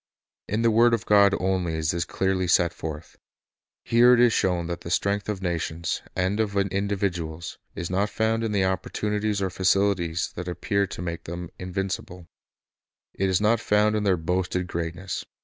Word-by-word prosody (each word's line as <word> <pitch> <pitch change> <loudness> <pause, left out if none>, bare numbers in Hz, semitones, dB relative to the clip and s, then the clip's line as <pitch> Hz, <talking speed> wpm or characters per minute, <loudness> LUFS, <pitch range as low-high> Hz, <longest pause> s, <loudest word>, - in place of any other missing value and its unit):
In 110 +3 -1
the 115 - +4
word 115 +2 +5
of 115 0 -7
God 100 -1 +5
only 90 -3 0
is 80 0 0
this 85 0 -1
clearly 95 -1 0
set 85 -1 +3
forth. 80 -1 -7 0.7
Here 120 +2 +6
it - - +1
is 120 -2 +5
shown 90 -2 +1
that 85 0 -4
the - - -7
strength 100 +4 0
of 100 -3 -3
nations, 85 -2 -2
as 95 +3 0
of 100 -2 0
individuals, 95 -4 -2 0.2
is 85 +1 -4
not 100 +3 +1
found 110 +1 0
in 110 - -1
the 100 -2 +2
opportunities 105 +2 -1
or 95 - -1
facilities 95 -2 +1
that 90 +1 -6
appear 100 +3 0
to 90 - -7
make 85 -1 -5
them 85 0 -6
invincible; 90 -1 -4 0.9
it 95 0 0
is 95 0 +2
not 110 +2 +3
found 105 0 +2
in 105 - +1
their 95 -3 +2
boasted 90 +2 -1
greatness. 85 +2 -4
95 Hz, 175 wpm, -25 LUFS, 85-105 Hz, 0.9 s, Here